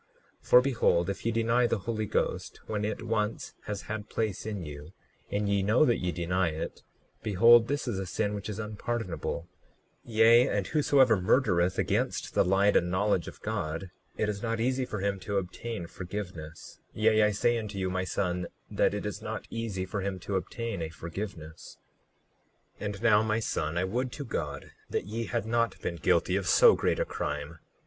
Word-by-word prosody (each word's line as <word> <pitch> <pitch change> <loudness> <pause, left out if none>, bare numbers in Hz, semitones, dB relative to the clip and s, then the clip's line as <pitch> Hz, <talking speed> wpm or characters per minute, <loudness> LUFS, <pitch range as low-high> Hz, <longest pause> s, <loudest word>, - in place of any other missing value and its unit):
39:6 - - -21
For 125 - +9
behold, 115 -9 +2
if 100 - -8
ye - - +2
deny 115 +2 +2
the 115 - 0
Holy 110 +1 -3
Ghost - - -2
when 105 -1 -2
it 110 +2 -3
once 110 -1 -2
has 105 -1 -4
had 110 -1 -5
place 110 -2 -2
in 105 -4 -4
you, 75 +3 -9 0.4
and 100 0 -1
ye 100 -1 +2
know 110 +9 +4
that 120 - +2
ye 90 -1 -1
deny 90 +1 0
it, 80 0 -4 0.4
behold, 115 +3 +6
this 145 -1 -2
is 105 -5 -1
a 95 - -4
sin 100 +3 -1
which 100 0 -5
is 105 - -4
unpardonable; 105 -5 -3 0.6
yea, 115 +2 +5
and - - 0
whosoever 135 -7 +4
murdereth 95 -4 +2
against - - -1
the - - +4
light 95 +2 +3
and 90 - +3
knowledge 95 -1 +1
of - - -10
God, 85 +4 -3 0.3
it 110 - +1
is 100 -1 -3
not 115 -1 -1
easy 130 +2 +1
for 110 -5 -5
him 100 -1 -1
to 100 +2 -2
obtain 95 +1 -4
forgiveness; 85 -3 -7 0.2
yea, 110 0 +4
I 105 - +5
say 115 +3 +1
unto 105 -2 -6
you, 95 -1 -1
my 95 0 -1
son, 90 0 -1 0.2
that - - +2
it - - -4
is - - -4
not - - -5
easy 110 -5 -3
for 100 +2 -3
him 95 0 -2
to 100 - -3
obtain 115 +1 -3
a 80 - -3
forgiveness. 85 0 -7 1.0
39:7 - - -5
And 105 +1 -6
now, 110 -3 +6
my 110 0 +1
son, 85 -6 -2
I 85 - +2
would 120 +7 -1
to 145 - -6
God 75 - -4 0.2
that - - -2
ye 115 +3 -3
had 95 +1 -2
not 115 +1 0
been 85 - -2
guilty 80 - +2
of - - -3
so - - +7
great - - 0
a - - +1
crime. 75 +2 -4
105 Hz, 195 wpm, -29 LUFS, 90-115 Hz, 1.0 s, For